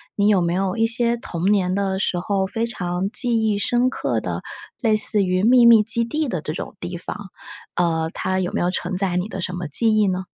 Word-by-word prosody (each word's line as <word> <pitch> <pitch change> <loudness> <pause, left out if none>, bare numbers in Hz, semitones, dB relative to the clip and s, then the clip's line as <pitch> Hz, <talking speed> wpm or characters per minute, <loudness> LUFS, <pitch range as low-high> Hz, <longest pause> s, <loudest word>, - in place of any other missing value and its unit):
你 205 0 +2
有 200 -3 +4
没 170 0 0
有 190 +2 -1
一 225 0 +3
些 235 0 0
童 185 -3 -2
年 185 -3 +1
的 195 -1 -1
时 190 - -1
候 190 +2 -1
非 225 +4 -2
常 180 -4 -3
记 235 -1 +1
忆 210 -2 +1
深 245 +4 +1
刻 - - -2
的， - - -4 0.4
类 225 -4 +2
似 215 -1 +3
于 185 +1 0
秘 245 +2 +6
密 230 -2 +7
基 230 +2 +1
地 300 +4 -2
的 180 -7 -3
这 155 - -4
种 - - -7
地 175 0 -5
方？ 175 - -6 0.6
呃， 165 -2 0
它 185 0 -2
有 180 -1 -2
没 - - -1
有 175 +1 +1
承 185 0 -3
载 185 -1 0
你 180 +2 -1
的 195 -3 -6
什 180 - -4
么 175 -2 -4
记 220 +10 +2
忆 210 -1 +3
呢？ 185 0 -1
195 Hz, 255 characters per minute, -21 LUFS, 180-225 Hz, 0.6 s, 密